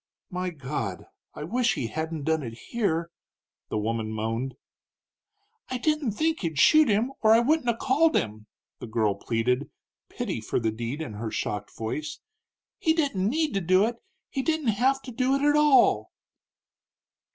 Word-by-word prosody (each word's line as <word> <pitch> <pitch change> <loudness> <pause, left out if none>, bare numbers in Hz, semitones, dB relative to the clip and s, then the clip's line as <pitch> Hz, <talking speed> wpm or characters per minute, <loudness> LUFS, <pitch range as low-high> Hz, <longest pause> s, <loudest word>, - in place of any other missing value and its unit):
"My 180 0 -2
God! 135 - -4 0.3
I - - -6
wish 240 +8 +1
he 125 - -2
hadn't 160 +5 -4
done 160 +1 +1
it 115 -4 -6 0.2
here!" 170 -7 0 0.6
the - - -2
woman 110 +1 -2
moaned. 115 +4 -3 1.1
"I 255 - -2
didn't 300 -3 0
think 320 +8 0
he'd 165 -5 -3
shoot 310 - +6
him 220 +5 +2
or 220 -1 +6
I 225 - +7
wouldn't 255 +1 +2
'a' 230 - +1
called 300 +6 +3
him," 110 0 -2 0.3
the - - -7
girl 110 -2 +1
pleaded, 120 +6 -1 0.4
pity - - -4
for - - -1
the 110 -2 0
deed 120 +7 -4
in 110 - -7
her 110 +2 -4
shocked 105 -1 -4
voice. 150 +7 -4 0.6
"He 320 - +3
didn't 275 - 0
need 310 +2 0
to 195 - 0
do 185 +3 +4
it 235 +1 -3 0.3
he 270 - -1
didn't 315 -3 0
have 260 +6 +2
to 255 - -8
do 255 +3 +1
it, 275 - -1
at 295 0 +4
all!" 300 -2 +4
185 Hz, 170 wpm, -26 LUFS, -, 1.1 s, I